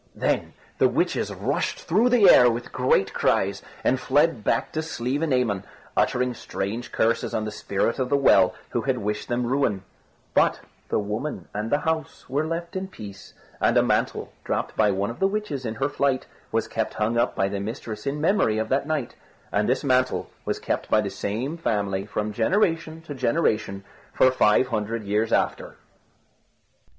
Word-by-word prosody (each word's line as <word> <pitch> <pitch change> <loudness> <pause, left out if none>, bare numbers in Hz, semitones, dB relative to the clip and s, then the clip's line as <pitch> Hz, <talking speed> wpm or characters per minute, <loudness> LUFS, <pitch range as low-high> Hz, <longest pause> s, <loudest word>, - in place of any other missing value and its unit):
Then - - 0 0.3
the - - +6
witches - - 0
rushed - - -2
through 215 +9 +3
the 240 -5 +6
air 125 -8 +8
with 120 +1 -4
great 125 -6 +2
cries, - - +1 0.2
and 130 - +2
fled 145 -3 +2
back 115 - 0
to 155 - -2
Slievenamon, 125 -7 -1 0.3
uttering 125 0 +1
strange 115 +2 -4
curses 115 +1 +1
on 110 - -1
the 105 - -4
Spirit 100 +3 -1
of 130 -1 0
the 140 - +3
Well, 95 -9 +5 0.2
who - - 0
had - - 0
wished 105 +1 -3
their 120 - 0
ruin; 120 -5 0 0.5
but - - +3 0.3
the - - +1
woman 105 - -3
and 105 +2 -3
the 145 - +2
house 160 -2 -3
were 145 +4 -1
left 170 +2 -4
in 190 0 -3
peace, 105 - -11 0.2
and - - +3
a - - +5
mantle - - 0
dropped - - -2
by 110 -1 +4
one 100 +2 0
of 115 - -11
the 195 - +4
witches 195 - -3
in 110 - -4
her 135 - 0
flight 140 -2 0 0.3
was - - 0
kept - - -2
hung 110 +2 0
up 120 - +1
by 95 - +1
the 100 0 -3
mistress 110 +2 -5
in 140 +2 -1
memory 155 - +2
of 110 - -1
that 135 +2 +1
night; 155 -6 -2 0.4
and 105 +2 +1
this 130 - +1
mantle 130 -2 +1
was - - -1
kept - - -3
by - - +4
the - - -1
same 125 +11 -3
family 100 - -1
from 105 0 -3
generation 165 - +1
to 155 - -7
generation 110 -7 0 0.3
for 130 - +5
five 125 0 +3
hundred 110 0 -2
years 105 +2 0
after. - - 0
125 Hz, 180 wpm, -25 LUFS, 105-145 Hz, 0.5 s, air